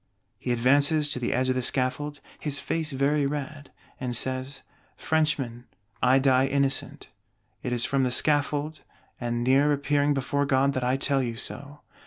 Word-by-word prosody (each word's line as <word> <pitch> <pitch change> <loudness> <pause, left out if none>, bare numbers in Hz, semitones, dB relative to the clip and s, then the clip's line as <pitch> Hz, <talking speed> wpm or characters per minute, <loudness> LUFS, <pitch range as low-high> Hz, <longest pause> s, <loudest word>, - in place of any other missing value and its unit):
He 125 - -3
advances 145 +5 +3
to 145 - 0
the 120 - -2
edge 130 +1 0
of - - +3
the 130 - -1
Scaffold, 145 +4 0 0.2
"his 145 -2 -1
face 160 +1 -1
very 140 +1 +1
red," 145 0 -6 0.3
and 125 -2 -3
says: 130 +3 -3 0.3
"Frenchmen, 140 -7 -1 0.4
I 130 +1 +5
die 135 -1 +3
innocent: 140 0 -1 0.5
it 125 - -4
is 120 -1 +1
from 135 -1 0
the 130 - +1
Scaffold 145 +3 +1 0.4
and 120 -1 -2
near 135 +4 +3
appearing 145 0 +1
before 140 +2 -1
God 140 0 +2
that 130 - -2
I 125 +2 +1
tell 135 0 +1
you 120 -3 -3
so. 140 +5 -6
140 Hz, 165 wpm, -26 LUFS, 130-145 Hz, 0.5 s, I